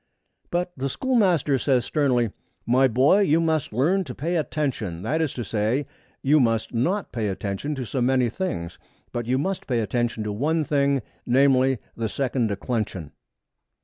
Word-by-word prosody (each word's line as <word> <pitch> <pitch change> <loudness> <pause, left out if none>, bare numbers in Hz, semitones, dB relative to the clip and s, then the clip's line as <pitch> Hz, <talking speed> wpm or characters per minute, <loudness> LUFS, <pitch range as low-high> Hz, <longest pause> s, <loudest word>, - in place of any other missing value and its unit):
But 180 +1 -1
the 135 +1 -2
schoolmaster 180 - +2
says 125 -1 +2
sternly, 125 -7 +1 0.3
'My 130 +3 +4
boy, 130 - +4
you 165 -5 +3
must 160 -3 0
learn 160 - +2
to 125 - -7
pay 170 +5 -2
attention; 130 - -2
that 155 +9 0
is 155 -4 0
to 120 - -3
say, 115 +6 0 0.4
you 150 +3 +5
must 115 -3 +1
not 175 - 0
pay 110 -3 -2
attention 100 +9 -3
to 130 -2 -4
so 130 +3 -2
many 130 0 +3
things, 85 - -4 0.3
but 120 -1 -4
you 130 +1 +2
must 190 +7 -2
pay 120 -3 +1
attention 115 +1 -1
to 105 - -3
one 155 +8 +1
thing, 140 -3 +1 0.2
namely, 130 0 +4 0.2
the 115 -1 -2
second 130 -1 0
declension.' 100 - -3
130 Hz, 165 wpm, -24 LUFS, 115-150 Hz, 0.4 s, you